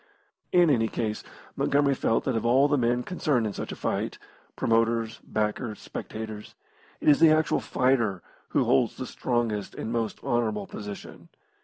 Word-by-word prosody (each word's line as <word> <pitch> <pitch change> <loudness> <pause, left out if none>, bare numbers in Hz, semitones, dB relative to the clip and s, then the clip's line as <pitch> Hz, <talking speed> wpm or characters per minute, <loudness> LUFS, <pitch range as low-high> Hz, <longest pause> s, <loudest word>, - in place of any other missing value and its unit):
In 175 -3 +5
any 115 -4 +2
case, 110 -1 -3 0.3
Montgomery 140 -1 +2
felt 115 -3 +1
that 130 - -1
of 115 - -1
all 130 +4 +4
the 145 - +2
men 120 -1 +1
concerned 150 -9 0
in 105 - -2
such - - -5
a - - -5
fight - - -2 0.4
promoters, 115 0 +1
backers, 110 +1 -2
spectators 110 -1 -7 0.5
it - - -4
is 145 -2 +6
the 165 -1 +7
actual 155 0 +3
fighter 120 -8 +1 0.3
who - - +2
holds 70 - +2
the - - -4
strongest 115 -5 -2
and 110 - -4
most 115 -2 -2
honourable 110 -4 0
position. 105 0 -9
115 Hz, 160 wpm, -27 LUFS, 110-135 Hz, 0.5 s, the